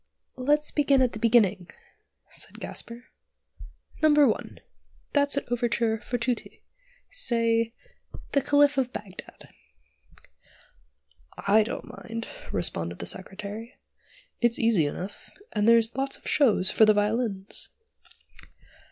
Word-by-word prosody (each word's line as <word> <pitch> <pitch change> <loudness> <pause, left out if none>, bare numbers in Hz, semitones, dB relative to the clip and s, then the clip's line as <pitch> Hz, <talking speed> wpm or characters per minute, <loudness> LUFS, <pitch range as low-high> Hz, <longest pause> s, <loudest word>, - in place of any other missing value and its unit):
"Let's 295 +3 +1
begin 280 -3 +3
at 250 - +1
the 220 - -7
beginning," 210 -6 +3 0.6
said - - -5
Gasper. 235 +1 -5 1.0
"No. 310 - +5
1: 295 -6 +2 0.5
that's 285 -1 +2
an - - -1
overture 235 -2 0
for 245 - -3
tutti; 240 0 -4 0.5
say, 230 - +1 0.6
'The 280 - +2
Caliph 285 0 +3
of 255 -2 -1
Bagdad.'" 195 -5 -10 1.9
"I 210 +2 +4
don't 215 - -4
mind," 230 0 -7 0.2
responded 85 -2 0
the - - -6
Secretary. 205 +4 -6 0.6
"It's 240 -1 +2
easy 220 -10 +3
enough, 185 +7 -7 0.2
and 210 0 +1
there's 230 0 +5
lots 270 +1 -1
of - - -12
show 250 -10 +3
for 190 +4 +4
the 215 0 +4
violins." 210 -1 -1
230 Hz, 115 wpm, -26 LUFS, 210-260 Hz, 1.9 s, No